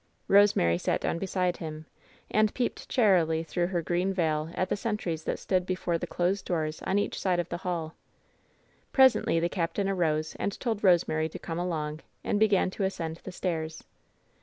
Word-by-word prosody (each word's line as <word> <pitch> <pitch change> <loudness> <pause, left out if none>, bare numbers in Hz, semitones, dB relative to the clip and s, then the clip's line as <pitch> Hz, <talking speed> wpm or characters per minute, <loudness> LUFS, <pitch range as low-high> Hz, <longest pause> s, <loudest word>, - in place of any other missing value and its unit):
Rosemary 195 - +5
sat - - 0
down 170 - -1
beside 180 -1 0
him, 155 -1 -7 0.5
and 215 0 +2
peeped 245 - -2
charily 175 -9 +3
through 175 +1 -1
her 175 -2 -1
green 180 +3 0
veil 155 -3 0
at 185 - 0
the - - +1
sentries 195 -7 -3
that - - -1
stood 185 -1 0
before 180 -2 -1
the 175 - -4
closed 180 +3 0
doors 155 -3 -2
on 195 - +2
each 205 - -1
side 185 -2 +1
the 170 - -3
hall. 170 -3 -3 1.0
Presently 260 -10 +5
the 170 - +1
captain 180 +2 -1
arose 160 -5 0
and 200 - -2
told 225 -4 -2
Rosemary 160 -4 +3
to - - -7
come 165 0 -5
along, 155 -4 -2 0.2
and 205 - 0
began 205 -3 +3
to 195 - -3
ascend 165 -4 -2
the 190 - -9
stairs. 160 -3 -3
175 Hz, 175 wpm, -28 LUFS, 160-195 Hz, 1.0 s, Rosemary